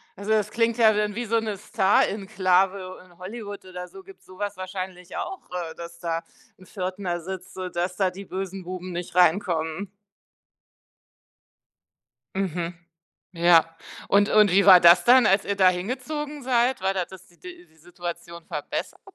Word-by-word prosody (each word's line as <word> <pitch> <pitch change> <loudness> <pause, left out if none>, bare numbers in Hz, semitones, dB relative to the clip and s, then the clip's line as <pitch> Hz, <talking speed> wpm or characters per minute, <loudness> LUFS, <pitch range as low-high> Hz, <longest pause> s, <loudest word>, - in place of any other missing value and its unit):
Also 200 +2 -8
das 210 -1 +2
klingt 230 +1 0
ja 220 -2 +5
dann 210 0 0
wie 240 +3 -4
so 230 +1 +1
'ne 215 -2 -4
Star-Enklave. 190 -2 +1
In 175 -2 -22
Hollywood 205 0 -8
oder 180 -1 -8
so, 385 - -12
gibt's 390 0 -17
sowas 205 +2 -5
wahrscheinlich 185 -1 -7
auch, 385 - -5
äh, 170 -3 -5
dass 170 0 -10
da 165 -1 -3 0.3
'n 185 - -17
Pförtner 185 -2 -4
sitzt, 185 +2 -8
sodass 180 -1 -4
da 190 -2 +1
die 195 +2 -9
bösen 190 0 -6
Buben 180 0 -7
nicht 175 0 -6
reinkommen. 180 0 +1 2.4
Mhm. 175 -2 -2 0.6
Ja, 170 -1 +6 0.4
und 205 +1 +4
und 210 -2 +5
wie 200 +2 +5
war 185 -2 +9
das 170 +1 +7
dann, 245 -2 +6
als 195 0 +3
ihr 200 - -2
da 190 -2 +6
hingezogen 270 +10 -3
seid? 245 -1 +1
War 190 +1 +1
das 185 -1 -5
si 175 - -25
die 360 -1 -12
die 160 - -28
Situation 170 0 -8
verbessert? 150 -4 -5
190 Hz, 155 wpm, -25 LUFS, 180-210 Hz, 2.4 s, war